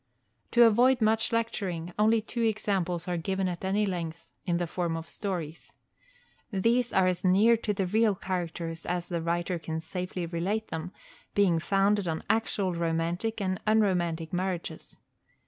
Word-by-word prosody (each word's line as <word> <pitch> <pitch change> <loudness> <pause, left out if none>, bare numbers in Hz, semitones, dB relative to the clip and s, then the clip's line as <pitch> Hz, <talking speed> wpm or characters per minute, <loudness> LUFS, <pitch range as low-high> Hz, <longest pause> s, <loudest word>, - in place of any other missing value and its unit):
To 240 - +6
avoid 245 +3 +5
much 220 0 +2
lecturing, 190 -7 -2
only 220 +1 +4
two 235 +2 -4
examples 195 -6 0
are 175 -1 -1
given 190 +3 -1
at 175 0 -4
any 200 +3 +1
length, 170 -4 -4 0.2
in 170 -1 +2
the 175 - 0
form 170 -1 -2
of 165 0 -7
stories. 175 -6 -5 0.8
These 230 +5 +2
are 190 - +4
as 180 -1 0
near 200 +5 +5
to 220 -1 -2
the 195 -2 -1
real 215 +2 +2
characters 170 -3 -4
as 175 -1 -2
the 170 -2 -2
writer 170 +1 -1
can 160 0 -4
safely 180 +2 -4
relate 185 +6 -2
them, 160 +2 -4 0.4
being 185 -5 +4
founded 195 +2 +2
on 160 -1 -2
actual 210 -4 0
romantic 170 +6 -1
and 185 -2 -2
unromantic 175 -7 +1
marriages. 180 -1 -3
185 Hz, 155 wpm, -28 LUFS, 170-210 Hz, 0.8 s, To